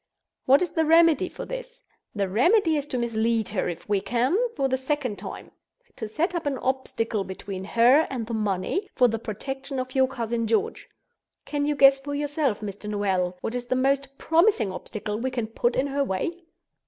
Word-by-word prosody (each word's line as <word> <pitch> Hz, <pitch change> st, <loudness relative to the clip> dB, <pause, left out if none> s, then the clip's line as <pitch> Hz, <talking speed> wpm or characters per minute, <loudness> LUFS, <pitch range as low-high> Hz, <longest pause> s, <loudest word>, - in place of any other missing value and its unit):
What 275 Hz, +6 st, +5 dB
is 355 Hz, -, -3 dB
the 320 Hz, -, +1 dB
remedy 330 Hz, -1 st, +5 dB
for -, -, -7 dB
this? -, -, -7 dB, 0.4 s
The 200 Hz, -2 st, 0 dB
remedy 320 Hz, -, +3 dB
is 290 Hz, -1 st, -2 dB
to 255 Hz, -, -3 dB
mislead 230 Hz, -2 st, 0 dB
her, 205 Hz, -2 st, -1 dB
if 170 Hz, -, -7 dB
we 205 Hz, -2 st, +1 dB
can, 245 Hz, -, +1 dB, 0.2 s
for 275 Hz, -2 st, +1 dB
the 260 Hz, -, +1 dB
second 260 Hz, -4 st, -2 dB
time—to 485 Hz, -, -10 dB
set 315 Hz, -, -1 dB
up 335 Hz, -4 st, -2 dB
an 275 Hz, -2 st, -1 dB
obstacle 240 Hz, -5 st, -1 dB
between 190 Hz, 0 st, -7 dB
her 245 Hz, +9 st, +4 dB
and 245 Hz, -4 st, -3 dB
the 230 Hz, -, -6 dB
money, 210 Hz, -, -1 dB
for 250 Hz, -, +5 dB
the 225 Hz, -1 st, -2 dB
protection 270 Hz, +6 st, -5 dB
of 255 Hz, 0 st, -4 dB
your 265 Hz, -1 st, +4 dB
cousin 235 Hz, -3 st, -2 dB
George. 410 Hz, -, -1 dB, 0.6 s
Can 290 Hz, -1 st, -1 dB
you 295 Hz, -, +1 dB
guess 275 Hz, -1 st, +6 dB
for 285 Hz, +1 st, -5 dB
yourself, 290 Hz, -6 st, -1 dB
Mr. 205 Hz, 0 st, -6 dB
Noel, 190 Hz, -3 st, 0 dB
what 225 Hz, -, -3 dB
is 245 Hz, -1 st, -4 dB
the 255 Hz, -, 0 dB
most 275 Hz, +1 st, 0 dB
promising 325 Hz, -, +3 dB
obstacle 210 Hz, +2 st, -5 dB
we 260 Hz, +3 st, -1 dB
can 245 Hz, -3 st, -2 dB
put 235 Hz, +2 st, -1 dB
in 260 Hz, -, +1 dB
her 280 Hz, 0 st, 0 dB
way?" 190 Hz, -, -1 dB
255 Hz, 190 wpm, -25 LUFS, 220-290 Hz, 0.6 s, guess